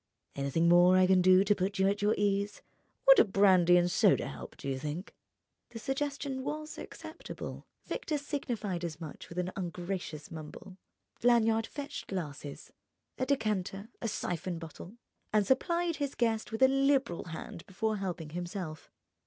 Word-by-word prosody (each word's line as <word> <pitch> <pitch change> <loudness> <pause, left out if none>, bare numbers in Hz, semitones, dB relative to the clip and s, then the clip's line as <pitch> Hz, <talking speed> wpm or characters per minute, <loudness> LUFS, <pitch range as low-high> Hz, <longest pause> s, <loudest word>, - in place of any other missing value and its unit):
"Anything 140 +5 +1
more 175 +2 +7
I 185 - +6
can 185 0 +5
do 185 +1 +6
to 205 +1 +4
put 195 +1 -2
you 190 0 +3
at 200 +1 0
your 210 +1 +3
ease? 205 0 0 0.4
Would - - +9
a - - +9
brandy 190 -4 +5
and 175 0 +2
soda - - +4
help, - - -9
do - - -7
you 135 -1 -1
think?" 155 - -5 0.6
The 235 - -9
suggestion 275 +2 -2
was 305 +2 -5
acceptable: - - -8 0.2
Victor 330 -12 -2
signified 235 - -3
as 160 -3 -4
much 155 -4 -9
with 170 - -10
an 180 +1 -1
ungracious 175 -3 -5
mumble. 165 +4 -9 0.4
Lanyard 225 -2 +4
fetched 285 -1 -6
glasses, 150 -6 -6 0.5
a 255 - 0
decanter, 210 -5 -1
a 230 - -1
siphon 180 -4 -3
bottle, 165 +6 -10 0.3
and 215 -1 +3
supplied 340 - +1
his 280 -1 -2
guest 225 -2 0
with 225 +3 +1
a - - +9
liberal 270 -8 +2
hand 165 0 -7
before 215 +3 -1
helping 175 -5 -4
himself. 175 -2 -5
195 Hz, 160 wpm, -31 LUFS, 175-235 Hz, 0.6 s, Would